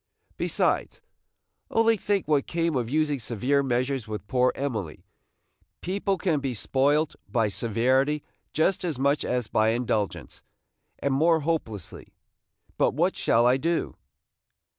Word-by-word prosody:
Besides, - - 0 0.7
only 225 0 +3
think 200 -3 -1
what 145 -3 +2
came 165 -2 0
of 120 -3 -1
using 150 0 +1
severe 125 +5 0
measures 130 -1 -1
with 105 -1 -5
poor 125 +3 +2
Emily! 110 - -4 0.8
people 195 +1 -1
can 170 -6 0
be 135 -3 -3
spoilt 145 +7 +1 0.2
by 115 -4 +1
severity 130 +8 +1 0.3
just 160 +5 +1
as 165 -7 -2
much 140 +2 +1
as 125 -1 -1
by 110 0 +2
indulgence, 105 - -2 0.6
and 140 - -1
more 160 +3 +3
hopelessly. 140 - -4 0.6
But - - +2
what - - +1
shall 115 +1 +2
I 125 +2 +4
do?" 165 +4 -1
135 Hz, 130 wpm, -26 LUFS, 120-155 Hz, 0.8 s, I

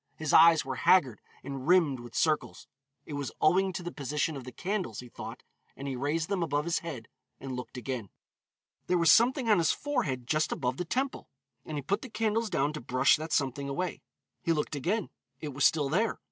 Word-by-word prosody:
His 155 -2 -3
eyes 165 -3 +7
were 130 -1 -4
haggard 130 - +3 0.2
and 135 0 -6
rimmed 165 -7 +4
with 120 -1 -11
circles. 155 -2 0 0.4
It 150 - -8
was 145 -1 -3
owing 190 +5 +3
to 180 0 -5
the 175 - -5
position 150 +2 -2
of 135 -3 -7
the 125 - -7
candles, 185 - -3
he 125 - -9
thought, - - -8 0.3
and 140 - -6
he 135 - -3
raised 150 +5 -1
them 195 -3 -1
above 150 -2 0
his 170 0 0
head 140 -10 -7 0.3
and 135 0 -6
looked 125 +1 -7
again. 125 -4 -4 0.8
There 180 - +2
was 170 -1 +5
something 245 +2 +4
on 210 -4 +5
his 165 - +3
forehead 135 - -2
just 155 +5 +1
above 130 -4 -2
the 180 - -3
temple, 260 +9 -2 0.4
and 155 - -5
he 145 - -4
put 200 - -1
the 260 - -8
candles 225 0 0
down 145 -2 0
to 150 - -6
brush 125 +2 +3
that 155 +1 -6
something 140 0 0
away. 175 +6 -3 0.4
He 170 -2 +1
looked 150 -1 -2
again, 185 - -1 0.3
it 150 - -5
was 140 +1 +2
still 150 -3 +3
there. 200 +10 +1
155 Hz, 210 wpm, -29 LUFS, 135-180 Hz, 0.8 s, eyes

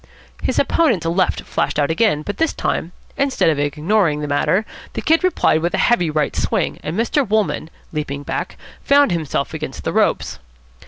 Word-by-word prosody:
His - - -1
opponent's 235 - +2
left 175 +3 +1
flashed 140 +1 -2
out 145 0 +2
again, 160 -4 +2
but 205 - -5
this 325 -1 +1
time, 165 - -2 0.3
instead 275 -11 +2
of 150 - -2
ignoring 150 +3 +1
the 150 - -3
matter, 180 +8 +1 0.3
the - - -3
Kid 325 +3 +3
replied 365 - +2
with 175 +1 0
a - - +2
heavy 175 -9 +3
right 150 -1 -1
swing; - - -1
and 160 +5 -4
Mr. 240 +5 +2
Wolmann, 215 -7 0 0.2
leaping 145 -2 -4
back, - - -4 0.3
found 285 -3 +4
himself 155 -3 -2
against 155 -4 -6
the - - -2
ropes. - - +1
170 Hz, 175 wpm, -19 LUFS, 150-220 Hz, 0.3 s, found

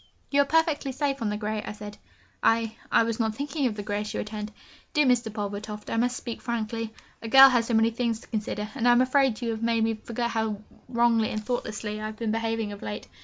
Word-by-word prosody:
'You 285 0 +5
are - - +2
perfectly 315 -2 +1
safe 275 0 -1
on 220 - 0
the 210 - -2
grey,' 215 0 -2
I - - -5
said. 210 0 -9 0.4
'I 225 -1 +2 0.2
I - - +5
was 230 0 -2
not 220 -1 0
thinking 285 +1 -1
of 220 - -3
the 205 - -5
grey,' 205 0 -2
she 210 - -5
returned. 210 0 -4 0.4
'Dear 300 -1 +4
Mr. 245 -3 +2
Pulvertoft, 210 0 -5
I - - 0
must 245 +2 +1
speak 235 - -6
frankly 230 -1 -3 0.3
a 225 - -6
girl 270 +3 +10
has 240 -3 +2
so 235 - +1
many 225 +1 +4
things 230 -1 -1
to - - -16
consider, 210 -1 -3
and 245 -3 0
I 240 - +7
am 240 - +5
afraid 255 -2 +2
you 230 - 0
have 220 0 -4
made 230 -1 +2
me 225 0 +2
forget 235 +2 -3
how 220 -2 -1 0.3
wrongly 235 -2 +3
and 215 -1 -4
thoughtlessly 215 -3 -3
I 215 - -3
have 215 0 -8
been 225 -1 -1
behaving 225 -1 -1
of 205 - -9
late. 105 0 -5
225 Hz, 240 wpm, -27 LUFS, 215-245 Hz, 0.4 s, girl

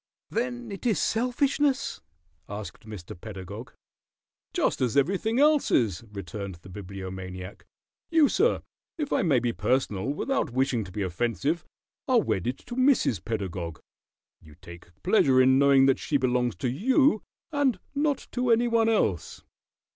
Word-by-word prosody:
"Then 245 0 -3
it 200 +5 -4
is 220 - +2
selfishness?" 265 +4 0 0.5
asked 105 0 -8
Mr. 100 -6 -8
Pedagog. 100 +4 -8 0.8
"Just - - 0
as 125 +1 +1
everything 195 - +1
else 300 0 +4
is," 105 -5 +1
returned 100 -1 -6
the 85 +3 -15
Bibliomaniac. 95 0 -8 0.4
"You, 320 -3 +5
sir, 445 - +2 0.3
if 300 -3 -2
I - - +2
may 160 -8 +3
be 120 -1 0
personal 125 -7 0
without 270 - -1
wishing 130 -3 +1
to 95 - -11
be 100 +2 -3
offensive, 115 - -1 0.4
are 255 -3 +5
wedded 125 - -1
to 240 - -7
Mrs. 255 - +2
Pedagog. 95 -7 -4 0.6
You 75 -1 -16
take 85 0 -13 0.2
pleasure 145 -9 +4
in 130 +1 +5
knowing 140 -1 +6
that 135 -1 +3
she 145 - 0
belongs 125 -2 0
to 130 - -2
you 245 - +3 0.3
and 285 -5 +1
not 290 -1 0
to 250 0 -1
any 235 +1 +4
one 230 -1 +3
else. 105 - 0
130 Hz, 145 wpm, -27 LUFS, -, 0.8 s, knowing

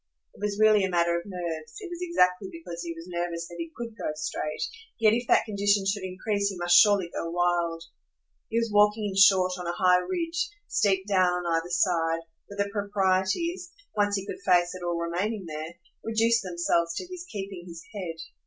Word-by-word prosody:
It - - -17
was 205 -1 -1
really 215 -2 +5
a 190 - +1
matter 170 -1 +2
of 170 +3 -4
nerves; 165 -5 -5
it - - -7
was 345 -1 -7
exactly 190 - +2
because 170 +1 -8
he 170 -1 -4
was 165 0 -9
nervous 170 -1 -3
that 170 - -10
he 165 0 -4
COULD 230 -2 -6
go - - -2
straight; 155 0 -3 0.4
yet 220 -1 +5
if 240 +1 -1
that - - +4
condition 200 -1 +1
should 195 +1 0
increase 200 +2 -1
he 195 - -6
must 175 0 +3
surely 200 -5 +5
go 165 - -3
wild. 170 -1 0 0.7
He 225 - -1
was 230 -1 0
walking 210 +1 +4
in 195 -2 -3
short 190 -1 +6
on 180 - -5
a 170 - -1
high 180 -1 +5
ridge, 335 - -2 0.2
steep 195 -2 +1
down 185 -3 +3
on 170 -1 +1
either 165 +1 -2
side, 165 -2 +1 0.3
where 200 - -10
the 200 0 -1
proprieties 205 - 0 0.2
once 205 -1 +2
he 195 -1 -3
could - - -7
face 175 -2 +3
at 185 - -8
all 175 -1 -1
remaining 180 +5 -2
there 155 +1 -6 0.3
reduced 225 +1 +2
themselves 170 -2 0
to - - -4
his 365 -1 -8
keeping 195 -3 -6
his 170 -1 -10
head. 180 -5 -5
185 Hz, 200 wpm, -27 LUFS, 170-210 Hz, 0.7 s, short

